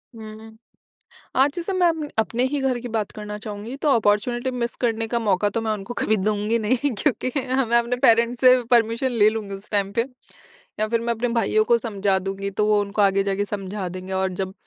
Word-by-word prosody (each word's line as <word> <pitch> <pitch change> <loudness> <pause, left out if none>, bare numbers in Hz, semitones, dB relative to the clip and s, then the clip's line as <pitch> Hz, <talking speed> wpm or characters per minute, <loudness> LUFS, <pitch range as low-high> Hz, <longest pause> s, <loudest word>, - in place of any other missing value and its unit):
हुँ। 220 0 -11 0.8
आज 280 +1 +4
जैसे 355 +2 -2
मैं 360 -2 +3
अप 315 -3 -2
अपने 230 +3 0
ही 290 -1 -1
घर 255 -2 0
की 245 - -6
बात 210 -2 -1
करना 210 -1 -7
चाहूँगी, 210 +3 -7
तो 290 +1 -1
अपॉर्च्युनिटी 240 +4 +1
मिस 240 -1 -3
करने 225 -1 0
का 235 +1 -1
मौका 205 -2 +1
तो 230 - -2
मैं 220 -1 -1
उनको 215 +3 -5
कभी 220 0 +2
दूँगी 210 +3 0
नहीं, 255 +6 0
क्योंकि 255 +2 0
अ, 260 -1 0
मैं 235 +1 +3
अपने 235 +1 -1
पेरेंट्स 235 +1 +4
से 255 -1 +6
परमिशन 235 +2 +2
ले 215 -3 +4
लूँगी 215 -3 -5
उस 195 +1 -8
टाइम 200 -1 +1
पे। 230 - +2 0.8
या 215 - +1
फिर 230 +1 0
मैं 235 0 -1
अपने 230 +2 -2
भाइयों 215 -1 +2
को 235 +2 +3
समझा 200 -4 0
दूँगी 195 +1 -4
तो 210 - +3
वो 210 -1 +3
उनको 205 +1 -2
आगे 195 0 +3
जाके 200 +1 -1
समझा 195 -1 -4
देंगे। 185 +1 -7
और 190 0 0
जब 190 +1 -4
220 Hz, 215 wpm, -23 LUFS, 205-240 Hz, 0.8 s, से